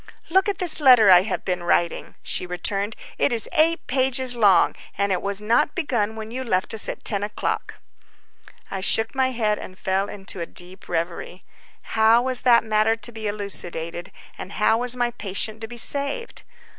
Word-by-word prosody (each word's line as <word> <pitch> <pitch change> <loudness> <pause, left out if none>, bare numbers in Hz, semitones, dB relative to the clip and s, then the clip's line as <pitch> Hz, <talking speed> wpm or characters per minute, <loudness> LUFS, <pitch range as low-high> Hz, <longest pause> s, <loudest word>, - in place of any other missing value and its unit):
"Look 380 +3 +3
at 400 - -2
this 340 -3 +4
letter 250 -8 +7
I 180 -1 +8
have 195 0 -4
been 180 -1 -1
writing," 175 0 -1
she 180 - -3
returned. 200 +4 -3 0.2
"It - - +2
is 230 -2 +2
eight 330 +2 +2
pages 260 -1 +1
long, 200 -6 +4 0.2
and 200 0 0
it 185 - 0
was 200 +1 -3
not 230 +7 +1
begun 235 - -1
when 220 0 -8
you 260 +2 -4
left 205 -5 -1
us 220 - +2
at - - -6
10 200 -2 -1
o'clock." 210 +1 -3 1.0
I 195 - -4
shook 225 +3 +3
my 265 -1 +1
head 220 -4 -1
and 185 - -10
fell 190 +1 -1
into 195 -2 -4
a 170 - -4
deep 180 +2 -9
revery. 170 +1 -4 0.5
How 220 +1 +5
was 255 -1 -3
that 240 -2 +5
matter 220 0 +2
to 225 +1 -3
be 220 -2 -5
elucidated, 175 -4 -3 0.3
and 200 - -8
how 220 +1 +2
was 245 0 +1
my 245 -1 0
patient 215 +1 -3
to 225 - -5
be 240 +1 -10
saved? 285 - -2
220 Hz, 185 wpm, -22 LUFS, 195-245 Hz, 1.0 s, I